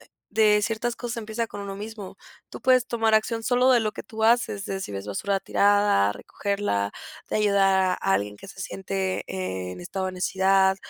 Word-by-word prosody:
eh, - - -19 0.3
de 210 -1 +4
ciertas 230 +2 -1
cosas 240 -1 -5
empieza 225 +1 -3
con 205 - -8
uno 200 -1 -5
mismo. 210 -1 -8 0.3
Tú - - -9
puedes 255 -1 +4
tomar 225 -2 +1
acción, 225 +1 +1
solo 250 +2 +3
de 240 - +5
lo 215 -1 0
que - - -7
tú 220 +1 -6
haces, 225 -4 +2
de 195 0 -3
si 100 - -6
ves 100 +1 -5
basura 195 - -1
tirada, 205 - +3
recogerla, 150 - -2 0.4
de - - -2
ayudar 195 -3 +3
a - - +1
alguien 105 +1 -2
que - - -12
se 195 - -11
siente, 190 -1 -3
en 90 -1 -4
estado 190 - -4
de 185 - -3
necesidad, 190 +1 +2
200 Hz, 195 wpm, -25 LUFS, 185-220 Hz, 0.4 s, de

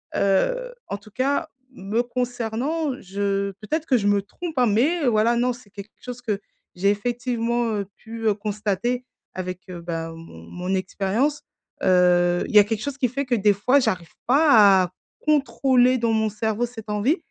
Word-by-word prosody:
heu, - - +1
en 200 - -4
tout 205 +1 -17
cas, 280 +7 0 0.2
me 210 0 -1
concernant, 250 +5 -2
je 200 +1 -1
peut-être 310 +9 -3
que 260 - +4
je 205 - -2
me 205 0 +3
trompe, 330 - -7
hein, 245 - +4
mais 275 +9 +2
voilà, 230 0 +3
non, 250 +1 +2
c'est 240 -4 -16
quelque 205 +1 -10
chose 250 -1 -7
que 215 -5 -2 0.4
j'ai 190 +3 +2
effectivement, 235 +1 -1
heu, 200 -2 -3
pu, 225 0 -8
heu, 215 - +4
constater 210 +3 -2 0.3
avec, 185 -1 -5
heu, 175 -2 -7
bah, 165 -1 -4
mon 165 - -12
mon 180 - -3
expérience, 205 +10 -1 0.4
heu, 180 -1 +4
il - - -6
y - - +11
a - - +8
quelque 215 0 -2
chose 285 0 -4
qui 255 -3 +1
fait 275 +4 -3
que 250 -1 +1
des 205 -1 +4
fois, 250 +8 +3
j'arrive 185 -10 -2
pas 230 -9 +6
à 180 - -4 0.3
contrôler 265 -4 +3
dans 230 -1 +1
mon 220 0 +1
cerveau 220 +2 -1
cette 225 -3 -11
envie 210 - +1
220 Hz, 180 wpm, -23 LUFS, 200-250 Hz, 0.4 s, y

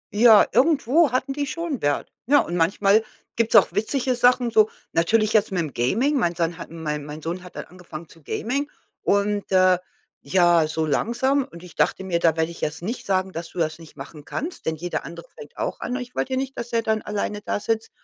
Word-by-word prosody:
Ja, 220 -1 +7
irgendwo 285 +2 +3
hatten 260 +2 -1
die 285 0 -2
schon 330 -4 -4
Wert, 145 0 -1 0.2
ne? 290 +2 +5
Und 175 - -5
manchmal 195 +5 +3 0.3
gibt's 230 0 +1
auch 205 - +7
witzige 255 +4 0
Sachen 245 0 +3
so 215 -1 +4 0.2
natürlich 215 +6 +2
jetzt 215 -1 +3
mit 185 - -1
dem 155 -4 -3
Gaming, 235 - +1
mein 170 -6 0
Sohn 170 0 -1
hat - - -8
mein 150 -3 -4
mein 150 +1 -9
Sohn 175 +3 -4
hat 180 - -13
dann - - -5
angefangen 170 -2 -11
zu 165 - -18
Gaming 275 - -3 0.3
und, 200 0 0
äh, 185 -1 +4 0.4
ja, 175 -4 +3
so 160 0 -2
langsam 250 - +1
und 170 -9 -13
ich 180 - -12
dachte - - +1
mir, 175 -3 -1
da 165 -2 +2
werde 160 +1 0
ich 170 - -12
jetzt 155 +3 -3
nicht 230 +3 -5
sagen, 190 -1 0
dass 165 0 -6
du - - -15
das 155 -1 -1
nicht 160 - -15
machen 145 +2 -10
kannst, 330 - -6
denn 160 - 0
jeder 175 +3 -4
andere 170 0 -10
fängt 145 - -13
auch - - -3
an. 245 - -3
Ich 250 -1 -6
wollte 260 - -2
ja - - 0
nicht, 270 0 -3
dass 235 - -6
er 230 -1 +1
dann 220 -1 0
alleine 210 0 -3
da 205 - -2
sitzt 225 +1 -2
200 Hz, 225 wpm, -23 LUFS, 165-245 Hz, 0.4 s, Ja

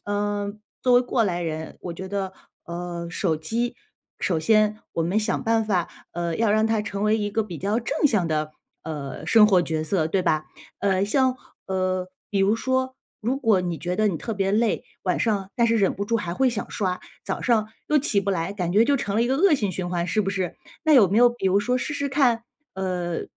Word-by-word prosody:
呃， 205 0 -1 0.3
作 250 - +3
为 245 - +7
过 245 -2 +1
来 175 -3 -1
人， 160 -1 -5
我 175 - -5
觉 190 +2 -7
得， 190 -1 -3 0.3
呃， 170 0 -5
手 170 -4 0
机 230 +10 -2 0.5
首 170 -4 +1
先 215 +4 +3 0.2
我 165 - 0
们 185 +6 +1
想 215 - -1
办 225 -1 +2
法， 185 -5 0 0.2
呃， 170 -1 -2
要 220 -2 +2
让 215 +1 +3
它 220 -1 +1
成 200 -1 -4
为 215 +1 +3
一 205 -1 -2
个 220 +2 +1
比 180 -6 -7
较 205 +7 0
正 270 +5 +1
向 195 -10 +1
的， 155 0 -1 0.3
呃， 145 -4 -6
生 220 -2 +6
活 185 -4 +4
角 160 -2 -2
色， 160 -1 +1
对 185 +3 +1
吧？ 155 -3 +1 0.4
呃， 195 -1 +2
像 260 +4 +2 0.3
呃， 185 -1 -1 0.2
比 200 - -1
如 195 +3 +4
说 260 +2 -1 0.2
如 245 +5 0
果 220 -8 +3
你 175 -2 -3
觉 180 +1 -3
得 215 -1 +3
你 170 - -1
特 225 - -4
别 195 0 0
累 225 +1 +1 0.2
晚 180 - +1
上， 200 -4 0
但 235 -1 +4
是 230 0 +3
忍 195 -2 +2
不 200 - -3
住 230 +2 +1
还 175 -3 -4
会 265 +3 +3
想 230 - -4
刷， 185 -3 -2 0.2
早 - - -3
上 220 -3 +2 0.2
又 300 0 +4
起 225 -8 +2
不 200 0 -1
来， 175 +1 -1
感 180 -4 -2
觉 215 +3 +5
就 285 - +3
成 205 -5 -3
了 225 - +3
一 - - +1
个 265 +2 +1
恶 355 -1 +5
性 205 -8 -1
循 175 -1 -3
环， 175 -1 -1
是 215 +5 +1
不 195 - -1
是？ 190 -3 -2 0.3
那 315 - +4
有 230 -10 +7
没 200 - 0
有 245 +1 +7
比 240 -5 -3
如 190 +2 +4
说 250 +5 +1
试 290 +4 -3
试 285 0 -1
看， 245 -5 +2 0.3
呃， 180 -3 -2
200 Hz, 245 characters per minute, -24 LUFS, 180-225 Hz, 0.5 s, 为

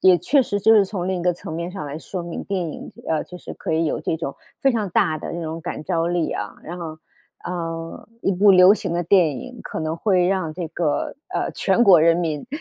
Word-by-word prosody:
也 185 -1 +7
确 280 +9 +3
实， 205 -5 -1
就 220 +3 +5
是 210 - +7
从 185 -3 -4
另 190 -1 -1
一 - - -5
个 180 - +3
层 165 - -8
面 170 +2 -4
上 180 -6 -6
来 145 +2 -5
说 180 +1 -6
明， 170 0 -5
电 195 -1 -2
影， - - -9 0.2
呃， 160 -1 0
就 180 - -10
是 - - -9
可 - - -6
以 165 +1 +2
有 - - -1
这 160 - -1
种 140 -4 -4 0.3
非 270 -2 +3
常 215 -4 -1
大 155 -2 +1
的 - - -6
这 170 - -4
种 160 +1 -5
感 155 - -5
召 170 -2 0
力 175 -2 0
啊。 105 -1 -4
然 175 +2 -6
后， 160 -2 -6 0.5
呃， 165 +1 -5
一 195 - +2
部 200 +3 +5
流 185 +1 +8
行 215 - -2
的 175 - 0
电 170 -6 +3
影， 250 -2 -10
可 - - -6
能 155 0 -2
会 180 0 +2
让 185 -5 -1
这 175 -2 -4
个， 155 -3 -1
呃， 370 - -2
全 240 - +2
国 185 -6 +8
人 165 +1 +5
民 160 -2 -2
175 Hz, 265 characters per minute, -22 LUFS, 160-190 Hz, 0.5 s, 流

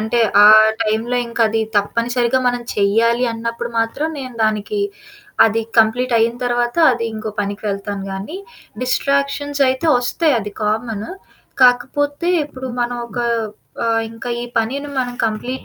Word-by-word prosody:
అంటే 220 +2 0 0.2
ఆ! - - +9 0.4
టైంలో 225 +3 -1
ఇంకా 235 0 0
అది 225 +1 0 0.2
తప్పనిసరిగా 235 +4 0
మనం 245 0 -2
చెయ్యాలి 230 +4 +2
అన్నప్పుడు 230 +1 -4
మాత్రం 230 +7 -1
నేను 255 -2 -8
దానికి 215 - -1 0.6
అది 225 0 +1 0.2
కంప్లీట్ 240 +3 +3
అయిన 230 +1 +2
తర్వాత, 240 0 0 0.2
అది 235 -1 -3
ఇంకో 215 0 -5
పనికి 200 0 -4
వెళ్తాను 200 0 -4
గానీ, 195 - -6 0.4
డిస్ట్రాక్షన్సైయితే 280 +2 0
వస్తాయి 290 +5 +1
అది 210 0 -6
కామను. 220 - -2 0.5
కాకపోతే 285 +6 +2 0.2
ఇప్పుడు 260 -2 -8
మనం 240 0 -1
ఒక 245 - -7 0.7
ఆహ్, 225 0 +1
ఇంకా 230 +2 -8
ఈ - - -4
పనిని 270 +6 -1
మనం 250 -2 -1
కంప్లీట్ 225 +4 -3
235 Hz, 135 wpm, -18 LUFS, 220-255 Hz, 0.7 s, ఆ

